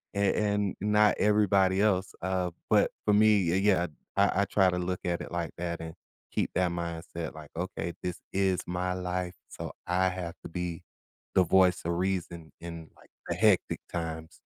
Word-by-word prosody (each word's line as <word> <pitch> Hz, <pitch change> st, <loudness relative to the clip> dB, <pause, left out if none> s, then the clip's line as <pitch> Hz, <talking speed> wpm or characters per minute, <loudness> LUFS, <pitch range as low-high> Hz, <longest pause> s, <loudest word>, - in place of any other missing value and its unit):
and 100 Hz, -1 st, +2 dB
and 105 Hz, -2 st, +1 dB
not 105 Hz, 0 st, +4 dB
everybody 100 Hz, -2 st, +3 dB
else, 95 Hz, -3 st, +2 dB
uh, 95 Hz, -1 st, -1 dB, 0.2 s
but, -, -, +4 dB
for 105 Hz, -, +4 dB
me, 105 Hz, -4 st, +5 dB
y 90 Hz, -, +2 dB
yeah, 95 Hz, -3 st, +3 dB, 0.3 s
I 100 Hz, 0 st, +4 dB
I -, -, 0 dB
try 95 Hz, -1 st, +3 dB
to 90 Hz, -, -1 dB
look 90 Hz, +1 st, -2 dB
at 85 Hz, -1 st, -1 dB
it -, -, -7 dB
like 85 Hz, -1 st, -2 dB
that 85 Hz, -1 st, -3 dB
and 80 Hz, 0 st, -6 dB, 0.4 s
keep -, -, -1 dB
that 90 Hz, -1 st, +2 dB
mindset 85 Hz, -1 st, -5 dB
like, 75 Hz, -2 st, -11 dB
"Okay, 85 Hz, -1 st, -3 dB
this 90 Hz, 0 st, -3 dB
is 95 Hz, -1 st, +2 dB
my 90 Hz, +1 st, -1 dB
life 90 Hz, 0 st, -3 dB
so -, -, -7 dB
I 95 Hz, +1 st, +2 dB
have 90 Hz, -2 st, -5 dB
to -, -, -7 dB
be 90 Hz, -1 st, -4 dB, 0.5 s
the 95 Hz, -, +6 dB
voice 90 Hz, +1 st, +4 dB
of 85 Hz, -, 0 dB
reason 85 Hz, -3 st, -2 dB
in, 85 Hz, -1 st, -8 dB
like, -, -, -21 dB, 0.2 s
the -, -, 0 dB
hectic -, -, +3 dB
times." 80 Hz, -2 st, -5 dB
90 Hz, 180 wpm, -29 LUFS, 85-95 Hz, 0.5 s, the